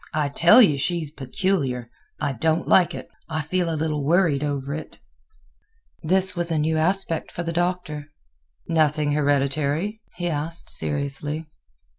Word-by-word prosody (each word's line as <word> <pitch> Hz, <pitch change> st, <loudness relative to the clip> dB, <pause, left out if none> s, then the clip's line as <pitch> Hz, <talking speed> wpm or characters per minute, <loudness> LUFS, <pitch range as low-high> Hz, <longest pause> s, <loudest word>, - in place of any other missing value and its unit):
I 150 Hz, -2 st, 0 dB
tell 175 Hz, -, +6 dB
you 150 Hz, -9 st, +2 dB
she's 165 Hz, 0 st, -2 dB
peculiar. 135 Hz, -5 st, -2 dB, 0.3 s
I 145 Hz, -3 st, -1 dB
don't 160 Hz, +6 st, 0 dB
like 180 Hz, -2 st, +4 dB
it; -, -, -8 dB, 0.2 s
I 155 Hz, -1 st, -2 dB
feel 175 Hz, +2 st, -1 dB
a 160 Hz, -, -2 dB
little 150 Hz, -2 st, -2 dB
worried 160 Hz, -2 st, +2 dB
over 140 Hz, -1 st, -3 dB
it." 155 Hz, 0 st, -8 dB, 1.0 s
This 185 Hz, +3 st, +4 dB
was 175 Hz, -1 st, -1 dB
a 165 Hz, -, 0 dB
new 155 Hz, +1 st, 0 dB
aspect 165 Hz, +1 st, 0 dB
for 175 Hz, -, -5 dB
the 165 Hz, 0 st, -4 dB
Doctor. 175 Hz, -4 st, -2 dB, 0.6 s
"Nothing 155 Hz, -2 st, +1 dB
hereditary?" 145 Hz, +7 st, 0 dB
he 175 Hz, 0 st, -3 dB
asked, 160 Hz, +1 st, +2 dB
seriously. 145 Hz, +2 st, -1 dB
155 Hz, 145 wpm, -23 LUFS, 145-175 Hz, 1.0 s, tell